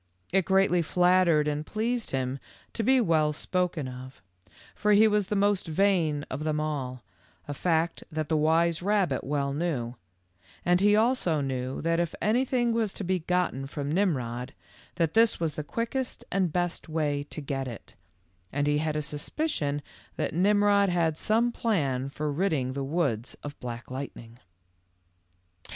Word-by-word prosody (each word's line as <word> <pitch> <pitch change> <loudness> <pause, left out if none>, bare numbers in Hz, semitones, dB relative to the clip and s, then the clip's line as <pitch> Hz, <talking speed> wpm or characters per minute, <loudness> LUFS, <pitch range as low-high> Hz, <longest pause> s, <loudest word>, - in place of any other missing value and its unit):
It 190 -2 +3
greatly 190 -2 +3
flattered 175 -2 +3
and 150 0 -1
pleased 230 +6 -2
him 130 0 -2 0.3
to - - -2
be 260 +4 +4
well 155 -8 +2
spoken 180 -2 -1
of, 130 +1 -9 0.5
for 210 0 +2
he 215 +2 +7
was 210 -2 +1
the 210 - -1
most 200 -2 +2
vain 160 -4 +1
of 140 +4 -5
them 155 -1 0
all, 135 -5 -3 0.4
a 145 - -3
fact 165 +2 0
that 155 -1 -2
the 160 - +1
wise 165 +2 +2
rabbit 195 -7 +1
well 140 -1 -1
knew, 140 -7 -2 0.7
and 180 +1 +3
he 205 +1 +5
also 220 - +2
knew 130 -2 -3
that 165 0 +1
if 170 -2 -1
anything 240 +2 +1
was 225 -3 0
to - - -5
be 185 0 0
gotten 170 -6 -1
from 145 +1 -4
Mmrod, 125 -10 -1 0.4
that 165 -2 0
this 225 0 +4
was 165 -3 -1
the 150 - -4
quickest 235 - -3
and 190 -4 +1
best 175 0 -2
way 150 -2 0
to - - -6
get 135 -2 -3
it, 115 -4 -9 0.6
and 145 +1 0
he 145 0 +2
had 155 0 -1
a 150 - -1
suspicion 145 - -2 0.3
that - - -2
Mmrod 200 +2 +4
had 170 -3 +1
some 225 +7 +1
plan 140 - 0
for 150 +2 -3
ridding 145 -6 0
the 140 0 -3
woods 135 -6 -1
of 145 0 -7
Black 120 0 -7
Lightning 125 -3 -7
160 Hz, 160 wpm, -28 LUFS, 145-195 Hz, 0.7 s, he